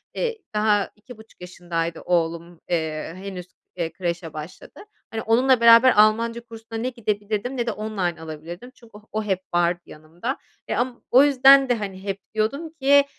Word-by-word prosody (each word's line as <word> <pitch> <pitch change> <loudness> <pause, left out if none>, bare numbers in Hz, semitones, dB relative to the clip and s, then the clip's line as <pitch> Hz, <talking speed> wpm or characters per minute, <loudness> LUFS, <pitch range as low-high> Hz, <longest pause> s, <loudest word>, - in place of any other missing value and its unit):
eee, 470 -2 -2 0.2
daha 210 -1 +2
2,5 220 -2 -15
yaşındaydı 175 -2 -4
oğlum, 170 0 -2
eee, 160 -1 -2
henüz, 185 -2 -7 0.3
eee, 165 -2 -3
kreşe 170 -2 -4
başladı. 155 +3 -10 0.3
Hani, 220 0 -3
onunla 250 +2 +3
beraber 235 +2 +8
Almanca 230 +2 +2
kursuna 225 -1 -9
ne 250 +2 -1
gidebilirdim 215 +1 -3
ne 240 0 -1
de - - +1
online 195 -6 -3
alabilirdim 165 +9 -9
çünkü 230 -2 -19
o - - -15
o 215 0 -2
hep 190 -3 -1
vardı 175 0 +1
yanımda. 165 - -6 0.3
Eee, - - 0
am 245 0 -2
o 260 +3 +8
yüzden 275 -1 +6
de, 245 - +3
hani, 195 -3 -6
hep 195 -1 -3
diyordum 275 +10 -1
ki, 280 +1 +6
210 Hz, 165 wpm, -23 LUFS, 175-235 Hz, 0.3 s, beraber